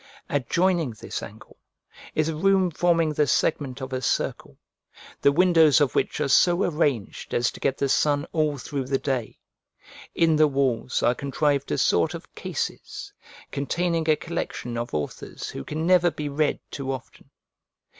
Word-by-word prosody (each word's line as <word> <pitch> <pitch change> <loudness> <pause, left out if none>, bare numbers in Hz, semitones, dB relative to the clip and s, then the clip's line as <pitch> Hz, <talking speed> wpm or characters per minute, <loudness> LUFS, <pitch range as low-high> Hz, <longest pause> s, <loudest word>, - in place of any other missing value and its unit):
Adjoining 170 +4 +1
this - - -5
angle 110 +2 -12 0.6
is 155 0 +2
a 160 - -2
room 190 +2 +3
forming 165 -1 +2
the 150 0 +2
segment 140 -2 0
of 130 0 -6
a 130 - -2
circle, - - -2 0.6
the 140 - +5
windows 165 -2 +5
of 145 -3 +2
which - - 0
are 150 - +1
so 175 +7 +4
arranged 145 - -1
as 120 0 +2
to - - -12
get 135 -1 0
the 140 - 0
sun 145 +1 +2
all 155 -3 +1
through 135 0 -4
the 135 +1 0
day: 130 -5 -3 0.8
in 165 -2 +3
the 155 0 +6
walls 135 -3 0
are 120 - +4
contrived 140 +1 -1
a - - 0
sort - - +2
of - - -11
cases, - - -5 0.4
containing 165 +3 -1
a 155 - +6
collection 150 -6 -5
of 120 0 -3
authors 75 -1 -5
who 70 - -6
can 155 - -3
never 180 -1 +5
be 150 -2 -5
read 145 +1 0
too 135 -1 -4
often. 130 -2 -9
145 Hz, 165 wpm, -25 LUFS, 135-165 Hz, 0.8 s, the